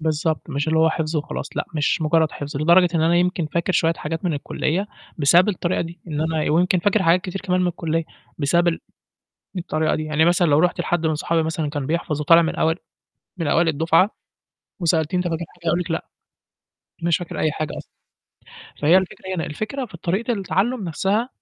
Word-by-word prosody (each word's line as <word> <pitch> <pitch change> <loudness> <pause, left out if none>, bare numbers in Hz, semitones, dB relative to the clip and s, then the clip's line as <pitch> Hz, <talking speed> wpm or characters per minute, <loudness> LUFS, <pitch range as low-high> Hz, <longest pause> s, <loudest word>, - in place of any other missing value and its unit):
بالضبط، 155 0 -1
مش 145 +1 -1
اللي 160 0 +2
هو 160 0 +4
حفظه 155 -1 -1
وخلاص، 150 - -5
لأ - - 0
مش 150 +1 +1
مجرّد 160 0 +2
حفظ، 145 -1 -6
لدرجة 170 +5 +5
إن 165 - +2
أنا 170 +2 +3
يمكن 180 -1 +1
فاكر 170 +4 -1
شوية 165 -2 +3
حاجات 160 +3 -5
من 175 - +1
الكلية 160 +6 -2 0.3
بسبب 170 +6 +5
الطريقة 185 -3 -1
دي، 170 +1 -6
إن 150 -2 -3
أنا 160 -1 0
ويمكن 180 +3 +3
فاكر 205 +3 +2
حاجات 170 +1 +4
كتير 190 +1 -5
كمان 185 -2 0
من 180 - +2
الكلية، 165 -1 -1 0.3
بسبب 170 +4 +2
ال 165 - -1 0.8
الطريقة 155 -3 0
دي، 155 - -2
يعني 155 +1 +2
مثلًا 175 +1 +3
لو 145 -2 +4
رُحت 180 +3 +2
لحد 175 -2 0
من 155 - +1
صحابي 165 +2 0
مثلًا 160 -1 -2
كان 145 -2 -3
بيحفظ 155 -1 -2
وطالع 165 +3 +6
من 160 - -1
أوائل 160 +1 +1 0.6
من 170 -3 -3
أوائل 165 +3 +3
الدفعة، 165 +5 +3 0.7
وسألتيه 165 0 +1
أنت 180 - -1
فاكر 165 0 -3
حاجة 175 -1 -16
هيقول 170 +2 +2
لِك 180 - -5
لأ، 165 - -2 1.0
مش 170 -1 +3
فاكر 175 -2 -6
أي 155 - +1
حاجة 155 0 -4
أصلًا، - - -12 0.9
فهي 160 +5 +6
الفكرة 190 0 -2
هنا، 165 - -2
الفكرة 220 - -4
في 190 - -11
طريقة 195 +9 -1
التعلُّم 210 +2 -1
نفْسها 195 - 0
165 Hz, 200 wpm, -22 LUFS, 155-180 Hz, 1.0 s, وطالع